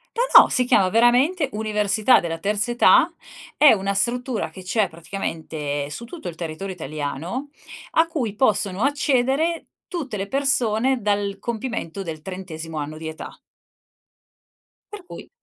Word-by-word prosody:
No, - - +7
no, - - 0
si 250 - +1
chiama 190 -6 +3
veramente: 255 - +3
"Università 215 +2 +2
della 165 -1 -4
terza 205 +5 0
età". 335 +7 +5 0.4
È 300 - +7
una 200 -1 -1
struttura 245 +3 0
che 190 - -11
c'è 200 +2 +1
praticamente 160 -4 -5
su 235 +11 -5
tutto 315 - -9
il 170 - -6
territorio 170 +4 -5
italiano, 155 - -5 0.4
a 325 +1 +3
cui 260 -11 -3
possono 205 -5 +1
accedere 285 +3 +1 0.2
tutte 285 - -5
le 195 0 -4
persone 260 -1 +1
dal 205 -1 -1
compimento 225 -6 -4
del 160 -3 -7
trentesimo 165 -4 -7
anno 150 +1 -5
di 160 0 -7
età. 160 0 -9 1.5
Per 410 -3 -10
cui - - -10
210 Hz, 140 wpm, -22 LUFS, 170-260 Hz, 1.5 s, No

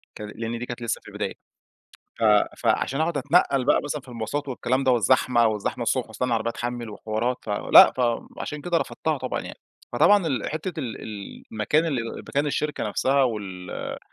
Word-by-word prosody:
كان 105 0 -7
لأن 115 +1 -4
دي 120 - -4
كانت 120 0 -7
لسّه 115 - -2
في - - -18
البداية. - - -4 0.9
ف - - -1 0.3
فعلشان 135 +3 +1
أقعد 160 -1 0
أتنقّل 140 -2 +2
بقى - - +4
مثلًا 145 0 -3
في 130 - -21
المواصلات 125 +5 -4
والكلام 130 +1 0
ده، 130 - +4
والزحمة، 120 -1 +3
والزحمة 105 -2 -2
الصبح - - 0
وأستنى 125 - -3
العربية 115 -1 0
تحمِّل 120 -1 -4
وحوارات، 110 +4 -2
فلأ، 105 -1 +7
فعلشان 125 +4 -2
كده 175 +2 +1
رفضتها - - -2
طبعًا - - -3
يعني. - - -9 0.3
فطبعًا 205 -4 +5
ال 130 -8 -1
حتّة 160 +3 -4
ال 115 -5 -5
ال 105 -2 -8
مكان 115 +9 +1
ال 120 -8 -3
مكان 145 +1 -1
الشركة 150 +1 -1
نفسها 135 +6 +2
وال 100 -7 -4
125 Hz, 175 wpm, -25 LUFS, 115-145 Hz, 0.9 s, فلأ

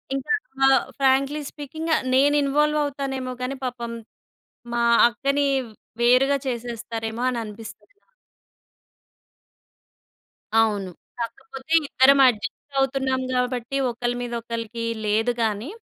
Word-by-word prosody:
ఇంకా 275 +10 -4 0.4
ఆహ్, 270 0 +4
frankly 275 +2 +2
speaking 315 +3 -7
ఆహ్, - - -1
నేనిన్‌వాల్వవుతానేమో 280 -1 +1
గానీ, 255 +2 -2
పాపం 240 -2 -4 0.8
మా 235 0 +1 0.2
అక్కని 275 +4 0 0.6
వేరుగా 255 +4 +4
చేసేస్తారేమో 230 -2 -4
అని 245 - -3
అనిపిస్తది 220 - -11
నాకు. - - -40 2.5
అవును. 205 -4 +2 0.3
కాకపోతే 265 +5 -6
ఇద్దరం 275 +2 +5
అడ్జస్టవుతున్నాం 265 +3 -1
గాబట్టి, 250 +1 -1
ఒకళ్ళ 240 0 -2
మీద 240 -1 -5
ఒకళ్ళకి 230 0 -5 0.2
లేదు 220 +3 +1
గానీ. 215 +4 -2
255 Hz, 95 wpm, -23 LUFS, 235-275 Hz, 2.5 s, ఇద్దరం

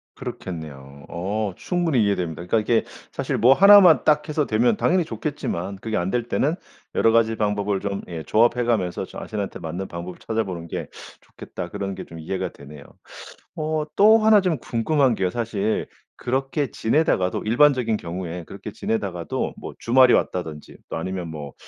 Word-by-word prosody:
그렇겠네요. 70 -5 -8
어 100 +3 -2
충분히 165 - 0
이해됩니다. 90 -4 -2
그러니까 110 +4 +2
이게 115 +2 +1 0.3
사실 - - -2
뭐 125 +5 +6
1 200 +5 +9
만 170 -4 +6
딱해서 150 0 +2
되면 115 - +2
당연히 180 -1 +2
좋겠지만 100 - -4
그게 110 +2 -4
안 90 +2 -1
될 120 +1 0
때는 150 +7 +1 0.4
여러 115 - +4
가지 115 -1 +3
방법을 105 -2 0
좀 100 -1 -3
예 80 -3 -6
조합해 120 +2 +3
가면서 95 -7 0
자신한테 105 -2 -6
맞는 85 +4 -5
방법을 85 +1 -7
찾아보는 95 -7 -3
게 - - -5 0.3
좋겠다 - - -8
그런 100 -1 -4
게 - - -7
좀 80 - -11
이해가 90 +4 -3
되네요. 70 0 -13 0.7
어 155 -1 -1
또 220 +2 +7
1 215 -2 +5
좀 175 -5 0
궁금한 125 +2 +1
게요. 95 -2 0
사실 110 -1 -2 0.3
그렇게 135 +2 -2
지내다가도 110 - +1
일반적인 120 -2 +3
경우에 85 0 -6
그렇게 - - -9
지내다가도 95 -6 -3
뭐 - - -8
주말이 125 +1 +5
왔다든지 80 -4 -2
또 - - -3
아니면 90 +1 -4
뭐 75 -3 -7
110 Hz, 360 characters per minute, -23 LUFS, 90-130 Hz, 0.7 s, 1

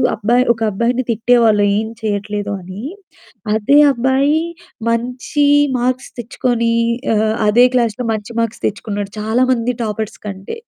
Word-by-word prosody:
అబ్బాయి 240 +4 +2
ఒక 225 - -17
అబ్బాయిని 240 +4 0
తిట్టేవాళ్ళు, 225 -2 +3 0.2
"ఏం 220 0 -3
చేయట్లేదు" 205 -1 -2
అని. 185 +5 -9 0.7
అదే 270 +7 +4
అబ్బాయి 265 +5 +2 0.5
మంచి 250 +5 -1 0.3
మార్క్స్ 255 +1 -2
తెచ్చుకొని 240 -1 -1 0.4
ఆహ్, 215 +1 +1
అదే 240 +4 +6
క్లాస్‌లో 235 -1 0
మంచి 215 +1 -6
మార్క్స్ 230 0 -4
తెచ్చుకున్నాడు. 205 -1 -4
చాలా 220 +3 0
మంది 245 +1 -1
టాపర్స్ 215 0 -4
కంటే. 195 - -7
230 Hz, 125 wpm, -17 LUFS, 210-250 Hz, 0.7 s, అదే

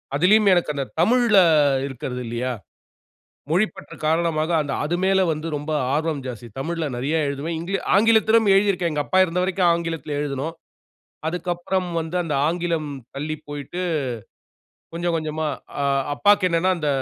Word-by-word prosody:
அதிலயும் 200 +7 +5
எனக்கு 175 -4 +1
அந்த 140 -1 -2 0.2
தமிழ்ல 240 -3 +4 0.5
இருக்கறது 125 -1 -5
இல்லயா? 120 +2 -2 1.0
மொழி 185 +7 +3
பற்று - - -11
காரணமாக 160 0 +1
அந்த 145 -2 -3
அது 165 +4 -1
மேல 190 0 +3
வந்து 155 +1 -4
ரொம்ப 150 +2 -5 0.2
ஆர்வம் 155 -2 -1
ஜாஸ்தி. 120 -2 -7
தமிழ்ல 165 +3 -2
நெறைய 135 +6 -1
எழுதுவேன். 140 +4 -3
இங் 170 +2 -7 0.3
ஆங்கிலத்திலும் 220 +1 +4
எழுதிருக்கிறேன். 195 -3 +2
எங்க 150 -1 0
அப்பா 185 - +1
இருந்த 180 0 -2
வரைக்கும் 185 -1 +2
ஆங்கிலத்தில 165 -3 -3
எழுதினோம். 145 +2 -3 0.7
அதுக்கு 175 +2 -3
அப்புறம் 180 +1 -2
வந்து, 165 +2 -5
அந்த 165 -3 -3
ஆங்கிலம் 165 -2 -1 0.3
தள்ளிப் 155 +2 -4
போய்ட்டு, 145 +4 -6 1.1
கொஞ்சம் 170 0 -1
கொஞ்சமா. 155 0 -3 0.3
அ, - - 0 0.3
அப்பாக்கு 205 +3 +4
என்னன்னா, 170 +2 +2
அந்த 150 -2 -1
165 Hz, 145 wpm, -22 LUFS, 150-180 Hz, 1.1 s, அதிலயும்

